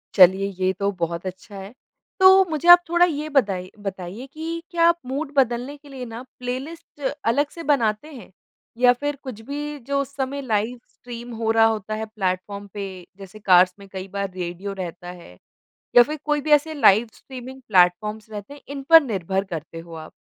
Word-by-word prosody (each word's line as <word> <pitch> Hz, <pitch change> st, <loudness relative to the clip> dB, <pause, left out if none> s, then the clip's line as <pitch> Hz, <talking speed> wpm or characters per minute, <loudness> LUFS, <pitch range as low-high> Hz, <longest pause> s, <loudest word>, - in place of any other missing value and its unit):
चलिए 190 Hz, +1 st, +6 dB
ये 185 Hz, 0 st, +2 dB
तो 200 Hz, 0 st, +1 dB
बहुत 170 Hz, +1 st, -3 dB
अच्छा 185 Hz, +2 st, -8 dB
है। 195 Hz, +3 st, -9 dB, 0.5 s
तो 375 Hz, -, +8 dB, 0.2 s
मुझे 315 Hz, +2 st, -3 dB
आप 350 Hz, 0 st, +11 dB
थोड़ा 345 Hz, +1 st, +5 dB
ये 305 Hz, -2 st, -3 dB
बताइ 195 Hz, -10 st, 0 dB, 0.2 s
बताइए 195 Hz, +6 st, -6 dB
कि 330 Hz, +2 st, -5 dB
क्या 335 Hz, -1 st, +4 dB
आप 340 Hz, 0 st, +3 dB
मूड 280 Hz, +3 st, -4 dB
बदलने 255 Hz, +2 st, +1 dB
के 290 Hz, 0 st, -18 dB
लिए 260 Hz, -2 st, -7 dB
ना 230 Hz, +1 st, -8 dB, 0.2 s
प्लेलिस्ट 280 Hz, +6 st, -7 dB, 0.3 s
अलग 285 Hz, +4 st, +1 dB
से 335 Hz, -, -7 dB
बनाते 225 Hz, 0 st, 0 dB
हैं? 245 Hz, -7 st, -12 dB, 0.5 s
या 245 Hz, 0 st, +6 dB
फ़िर 290 Hz, +3 st, -3 dB
कुछ 250 Hz, -5 st, -8 dB
भी 295 Hz, +1 st, -5 dB
जो 280 Hz, 0 st, 0 dB
उस 280 Hz, 0 st, -8 dB
समय 275 Hz, +1 st, -3 dB
लाइव 230 Hz, 0 st, -1 dB
स्ट्रीम 240 Hz, 0 st, -10 dB
हो 225 Hz, 0 st, -2 dB
रहा 225 Hz, 0 st, +5 dB
होता 215 Hz, -1 st, -1 dB
है 220 Hz, 0 st, -4 dB
प्लैटफ़ॉर्म 200 Hz, -1 st, -4 dB
पे 205 Hz, -1 st, -4 dB, 0.3 s
जैसे 195 Hz, +1 st, -12 dB
कार्स 180 Hz, -2 st, +5 dB
में 200 Hz, -, -13 dB
कई 190 Hz, 0 st, -6 dB
बार 200 Hz, -1 st, -2 dB
रेडियो 180 Hz, +2 st, -5 dB
रहता 175 Hz, +1 st, -8 dB
है 90 Hz, -, -15 dB, 0.6 s
या 245 Hz, -, +10 dB
फ़िर 300 Hz, +4 st, -6 dB
कोई 295 Hz, -1 st, +1 dB
भी 305 Hz, -, -3 dB
ऐसे 300 Hz, +2 st, +4 dB
लाइव 235 Hz, -6 st, +5 dB
स्ट्रीमिंग 260 Hz, 0 st, -10 dB
प्लैटफ़ॉर्म्स 210 Hz, +3 st, +2 dB
रहते 210 Hz, +4 st, -8 dB
हैं 285 Hz, -, -14 dB
इन 280 Hz, -1 st, -6 dB
पर 325 Hz, 0 st, +10 dB
निर्भर 195 Hz, -5 st, -2 dB
करते 165 Hz, +1 st, -6 dB
हो 165 Hz, 0 st, -11 dB
आप? 155 Hz, 0 st, -9 dB
230 Hz, 195 wpm, -23 LUFS, 195-285 Hz, 0.6 s, आप